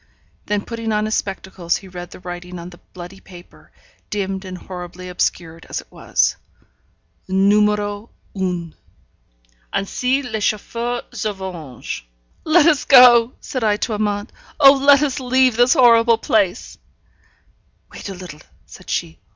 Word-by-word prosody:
Then 205 -1 -1
putting 230 -1 -4
on 210 0 0
his 215 - -2
spectacles, 190 -4 -2
he 195 - -13
read 175 -1 -8
the - - -12
writing 180 0 -8
on 170 +1 -9
the 175 - -15
bloody 180 +1 -10
paper, 175 -2 -16 0.4
dimmed 195 -1 -3
and 185 -1 -7
horribly 180 0 -9
obscured 165 -2 -3
as - - -3
it - - -14
was: - - 0 0.9
NUMÉRO 205 +2 +1 0.2
UN. 180 -4 -3 1.0
Ainsi 255 +7 0
les 230 -4 -4
Chauffeurs 235 +3 -2
se 215 - -2
vengent. 175 - -7 0.4
'Let 315 0 +5
us 310 -5 +3
go!' 250 -2 +7
said 255 -3 -4
I 210 -1 +2
to 220 - -2
Amante. 205 0 -2 0.3
'Oh, 275 -2 +9
let 280 +1 +5
us 275 -3 -1
leave 255 -1 +2
this 245 +2 +4
horrible 235 -4 +5
place!' 205 -6 -1 1.1
'Wait - - -8
a 195 - -6
little,' 180 -4 -10 0.2
said - - -14
she. 80 -1 -3
205 Hz, 145 wpm, -20 LUFS, 180-235 Hz, 1.1 s, Oh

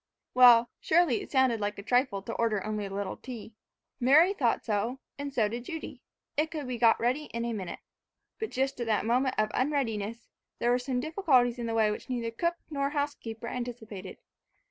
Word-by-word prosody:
Well, 240 -2 +7
surely, 325 -7 +3
it - - -9
sounded 260 -4 +3
like 205 0 -2
a 200 - -7
trifle 245 -4 +1
to 230 - -5
order 215 -4 0
only 210 -1 -2
a - - -10
little 195 -1 -3
tea. 235 -3 -9 0.5
Mary 305 +9 +6
thought 250 - 0
so, 225 +5 -1 0.2
and 285 0 -4
so 230 -6 +2
did 235 +3 -5
Judy, 320 +1 -7 0.3
it 305 +2 +1
could 300 -5 -5
be 250 -2 -4
got 230 -1 +5
ready 255 +6 0
in 235 -2 -4
a 235 - -2
minute. 190 -5 -5 0.6
But 440 - -3
just 270 0 -1
at 235 - -2
that 215 -2 +1
moment 255 +3 +2
of 215 0 +1
unreadiness, 230 -5 -1 0.3
there 240 - +1
were 245 - +3
some 250 0 -2
difficulties 265 -7 +2
in 235 - -3
the 225 - -2
way 215 -2 +3
which 210 - -6
neither 235 -2 -2
cook 340 +9 -1 0.2
nor 280 -1 0
housekeeper 285 -6 -4
anticipated. 225 -6 -6
240 Hz, 195 wpm, -29 LUFS, 225-270 Hz, 0.6 s, Well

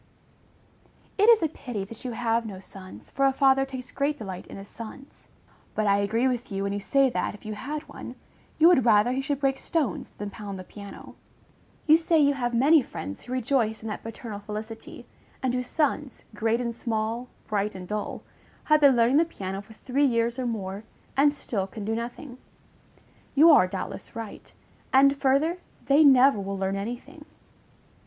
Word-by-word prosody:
_ - - +4
It 440 - +7
is 450 -6 +6
a - - +3
pity 245 -9 -6
that 225 +4 -11
you 250 -2 -4
have 230 0 0
no 200 -4 -7
sons, 190 0 -12
for 275 0 +2
a - - +3
father 270 0 +3
takes 255 -1 -8
great 285 +1 -1
delight 190 -7 -7
in - - -9
his 195 0 -9
sons; 235 +6 -11 0.5
but 215 - 0
I 200 0 +3
agree 225 +5 +1
with 250 -2 -2
you, 195 0 -2
when 200 0 -1
you 205 - -2
say 275 +6 +3
that, 220 - -2
if 210 - -17
you 215 - -4
had 295 +8 -5
one, - - -9 0.4
you 320 - +7
would 345 -8 +5
rather 220 0 +4
he 260 +1 -1
should 275 0 -2
break 270 -1 +1
stones 295 - -2
than 205 0 -6
pound 200 -1 -7
the 185 - -7
piano. 200 +1 -11 0.7
You 310 0 +7
say 330 0 +2
you 285 -2 +4
have 245 -3 -2
many 290 +6 +6
friends 95 - -7
who 250 - -7
rejoice 240 -3 0
in 225 - -4
that 210 - -5
paternal 225 -2 -7
felicity, 215 +2 -8 0.4
and 255 -2 +1
whose 250 0 -2
sons, 295 -3 -1
great 225 +2 0
and 235 -1 -2
small, 230 +1 -2 0.2
bright 210 -1 -1
and 180 -1 -8
dull, 210 +1 -4 0.4
have 305 0 +4
been 280 -3 +7
learning 240 +4 +4
the 325 - +6
piano 195 - -6
for 215 +2 -15
three 265 +5 0
years 235 -1 +1
or 255 - -1
more, 200 -3 -4 0.3
and 285 +2 +5
still 215 -9 -3
can 205 +1 -7
do 220 - -1
nothing. 245 +3 -6 1.0
You 320 +4 +8
are 185 -11 +6
doubtless - - -6
right; 225 -3 -8 0.4
and, 275 +1 +6
further, 280 +5 +2 0.3
they 285 +3 +5
never 270 -4 +6
will 195 0 -4
learn 195 0 -1
any 220 +5 -3
thing. 300 +4 -15
240 Hz, 195 wpm, -26 LUFS, 210-275 Hz, 1.0 s, You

